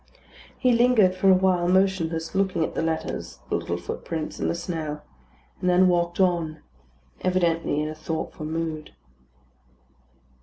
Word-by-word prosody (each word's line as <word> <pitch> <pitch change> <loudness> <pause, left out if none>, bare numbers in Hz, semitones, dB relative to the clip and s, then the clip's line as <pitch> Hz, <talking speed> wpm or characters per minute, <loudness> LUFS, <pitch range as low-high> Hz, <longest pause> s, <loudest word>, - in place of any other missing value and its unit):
He 255 -1 +3
lingered 235 -5 +4
for 185 +1 +2
awhile 185 -2 +4
motionless, 175 -3 +1
looking 190 -4 +1
at - - -3
the - - -1
letters, 160 0 -3
the - - 0
little 85 - -2
footprints, 155 - -5
and - - 0
the - - 0
snow; 160 -4 -4 0.6
and 180 - 0
then 180 +1 +5
walked 175 0 +1
on, 170 -4 +1 0.6
evidently 170 -4 +1
in - - -2
a 155 - -4
thoughtful 155 0 -5
mood. 160 -1 -4
170 Hz, 140 wpm, -25 LUFS, 160-185 Hz, 0.6 s, then